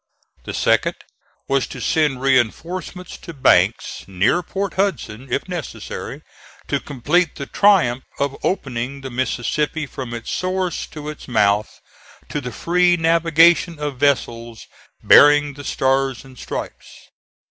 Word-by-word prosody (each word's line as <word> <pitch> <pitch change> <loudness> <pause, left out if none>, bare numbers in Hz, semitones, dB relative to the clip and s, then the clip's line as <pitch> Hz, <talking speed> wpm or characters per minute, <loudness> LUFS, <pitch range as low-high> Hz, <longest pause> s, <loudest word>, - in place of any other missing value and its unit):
The - - -5
second - - +2 0.5
was 135 -1 +1
to - - -9
send 150 -5 +1
reinforcements 165 - -1
to 170 - -10
Banks 135 - +2
near 100 - +1
Port 195 +3 -4
Hudson, 135 - -2
if - - -1
necessary, 175 -4 -6 0.5
to - - +1
complete 150 +6 0
the 140 - -6
triumph 165 -11 +3
of 140 -1 -1
opening 135 -5 -2
the 135 -1 -7
Mississippi 130 +5 -1
from 130 -4 -7
its 115 - -6
source 185 -1 -2
to 150 -1 -9
its 150 0 -8
mouth 105 -3 +1 0.5
to 150 - -3
the 125 -2 -6
free 175 +6 +2
navigation 165 +1 +4
of 145 -3 -4
vessels 120 -5 -1 0.4
bearing 145 0 +6
the 145 +1 -10
Stars 135 -1 0
and 130 -1 -15
Stripes. - - -8
145 Hz, 130 wpm, -20 LUFS, 130-170 Hz, 0.5 s, bearing